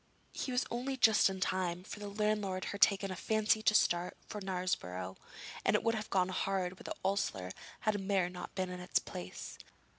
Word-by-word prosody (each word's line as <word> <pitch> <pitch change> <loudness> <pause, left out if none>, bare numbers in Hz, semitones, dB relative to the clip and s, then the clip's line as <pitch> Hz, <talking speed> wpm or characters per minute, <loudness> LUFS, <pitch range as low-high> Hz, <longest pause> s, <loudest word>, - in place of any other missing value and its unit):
He 260 - -3
was 250 0 +1
only 260 +3 -2
just 220 -5 +6
in 190 0 -4
time, 180 -1 0
for 205 - -7
the 205 - -5
landlord 205 -2 0
had 200 - -5
taken 195 -1 +4
a - - -3
fancy 215 +2 +2
to 215 0 +4
start 175 -3 +3
early - - -30
for 210 - -5
Knaresborough, 135 - -2 0.5
and - - +3
it - - +2
would 230 - +3
have 215 -1 -3
gone 185 -1 +2
hard 185 -1 -1
with - - -12
the - - -3
ostler 105 - 0 0.3
had 215 -2 +2
the 205 - -2
mare 195 -2 +2
not 180 0 -7
been 185 -1 -1
in 180 - -5
its 180 - +1
place. 90 +1 -5
195 Hz, 210 wpm, -34 LUFS, 180-215 Hz, 0.5 s, just